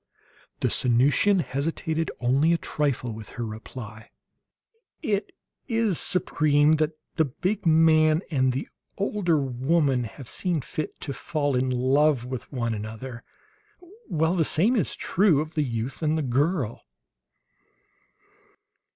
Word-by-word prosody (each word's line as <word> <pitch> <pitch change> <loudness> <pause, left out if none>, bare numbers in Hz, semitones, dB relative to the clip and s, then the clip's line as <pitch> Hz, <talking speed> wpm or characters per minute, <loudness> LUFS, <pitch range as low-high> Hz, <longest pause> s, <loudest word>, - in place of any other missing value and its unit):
The - - +2
Sanusian 140 - +3
hesitated 160 +3 -2
only 135 +7 +3
a - - +2
trifle 140 -7 -2
with 110 -1 -9
her 120 - -2
reply: 110 0 -9 0.9
"It 205 -6 -1 0.4
is, 225 - +1
Supreme, 155 -4 +3
that 155 0 -1 0.2
the 160 - +4
big 180 - -2
man 155 0 +4
and 130 -3 +2
the 130 +3 -3 0.3
older 195 -4 +1
woman 135 0 +1
have 120 +3 -10
seen 175 - -1
fit 155 +4 -5
to 140 - -4
fall 145 -1 -1
in 130 +1 +1
love 130 +1 +2
with 125 -1 -6
one 120 -4 -2
another, 110 +4 -7 0.8
while 160 +1 +1
the 175 -3 +2
same 195 - +3
is 200 - 0
true 185 -6 +2
of 155 +2 -4
the 155 - 0
youth 120 0 -4
and 155 0 +1
the 155 - -1
girl." 135 - 0
145 Hz, 130 wpm, -25 LUFS, 125-165 Hz, 0.9 s, the